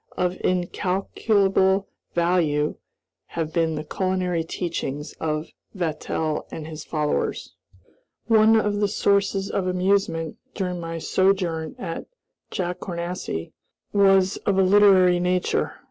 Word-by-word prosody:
Of 180 0 -1
incalculable 190 +1 +1 0.3
value 170 -4 +1 0.6
have 160 -1 -2
been 165 -2 +1
the 150 - -4
culinary 180 0 -1
teachings 160 -4 -4
of 155 -1 -2 0.3
Vatel 160 -2 -2
and 155 - -7
his 155 -1 -7
followers. 150 -2 -2 0.7
One 220 0 +5
of 205 -1 0
the 205 - +2
sources 200 -1 +1
of 190 -2 -1
amusement, 180 -3 0 0.2
during 180 -3 -2
my 165 0 -5
sojourn 175 -3 0
at 165 - -5 0.4
Jacournassy, 175 - -4 0.4
was 195 -1 +4
of 195 -2 0
a 190 - +5
literary 185 -2 +6
nature. 180 0 0
180 Hz, 110 wpm, -24 LUFS, 165-195 Hz, 0.7 s, literary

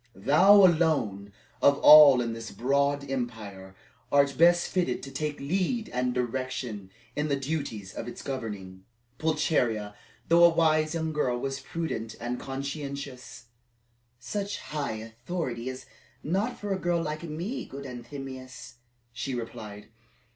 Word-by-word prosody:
"Thou 190 - +6
alone, 150 - +1 0.3
of 140 0 +5
all 145 -5 +9
in 115 -1 -2
this 115 0 -7
broad 140 +2 0
empire, 110 -7 -5 0.4
art 140 -1 +3
best 175 +1 +5
fitted 175 -10 -1
to 135 - -7
take 150 +2 -3
lead 190 - -1
and 125 0 -1
direction 125 -4 -3 0.3
in 150 +1 -1
the 140 - +1
duties 135 -9 -4
of 115 - -6
its 120 - -8
governing." 105 -8 -6 0.4
Pulcheria, 125 -10 0 0.3
though 170 +1 +5
a 170 - +9
wise 155 -1 +2
young 160 -1 -2
girl, 130 -5 0
was 135 +2 -3
prudent 130 -7 -4
and 120 +1 -3
conscientious. 140 -2 -6 0.7
"Such 200 +11 -4
high 150 -5 -4
authority 120 +3 -5
is 130 0 -8 0.4
not 200 +9 -1
for 205 -1 -2
a 190 - -3
girl 175 -1 +1
like 155 -1 -4
me, 170 - -5
good 140 +1 -9
Anthemius," 130 0 -9 0.4
she 125 +2 -4
replied. 105 -3 -7
135 Hz, 135 wpm, -28 LUFS, 120-155 Hz, 0.7 s, all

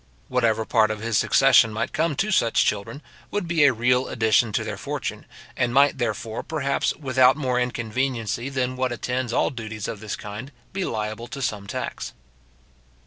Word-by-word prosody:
Whatever 115 -3 +1
part 110 -2 +3
of 105 0 -4
his 115 -1 +1
succession 130 -4 +5
might 110 - -3
come 160 -1 0
to 215 +9 0
such 115 - +3
children, 105 +8 -2 0.3
would 205 -4 -2
be 165 -3 +4
a 140 - +6
real 125 +2 +2
addition 110 0 +2
to - - 0
their - - -4
fortune, - - -5 0.3
and 120 0 0
might, 140 0 +4
therefore, 115 -2 -2
perhaps, 140 -3 -1
without 130 -2 +3
more 130 -4 0
inconveniency 120 0 -2
than 130 -1 -1
what 130 -1 -1
attends 125 +1 -2
all - - +1
duties 110 -4 -6
of 105 - -5
this 110 -1 -4
kind, 105 +7 -8 0.2
be 190 -1 -1
liable 110 +1 -4
to 140 - -7
some 105 -6 -3
tax. - - -5
125 Hz, 175 wpm, -24 LUFS, 110-135 Hz, 0.3 s, a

